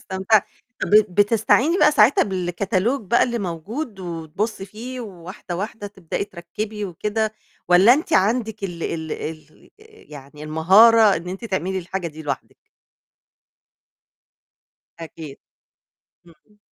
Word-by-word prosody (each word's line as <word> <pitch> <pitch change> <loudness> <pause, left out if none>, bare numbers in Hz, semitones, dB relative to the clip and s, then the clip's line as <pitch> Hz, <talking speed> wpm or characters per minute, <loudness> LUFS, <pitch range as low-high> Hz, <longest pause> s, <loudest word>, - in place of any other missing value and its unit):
استمتعتِ. 190 +2 +1 0.4
طَب - - -1
ب 210 0 +6
بتستعيني 230 - +3
بقى 300 - +5
ساعتها 225 +1 +5
بالكتالوج 190 +6 -1
بقى 235 +5 +3
اللي 240 -1 -1
موجود 200 - -5
وتبُصّي 180 +4 -4
فيه 240 +5 -8
وواحدة، 185 -3 -8
واحدة 205 +2 -5
تبدئي 190 -2 -5
تركِّبي 205 +4 -6
وكده، 210 +4 -2 0.4
والَّا 185 +7 +7
أنت 315 +3 -4
عندِك 220 -2 +1
ال 175 -3 -6
ال 160 -1 -4
ال 155 0 -8 0.4
يعني 145 +1 -11
المهارة 200 +8 +5
إن 170 +2 -7
أنتِ 190 +5 -7
تعملي 190 -2 -2
الحاجة 185 0 -5
دي 160 -1 -9
لوحدِك؟ 145 - -5 2.4
أكيد. 160 -3 -9 0.9
إمم. 175 +6 -23
195 Hz, 120 wpm, -21 LUFS, 170-220 Hz, 2.4 s, والَّا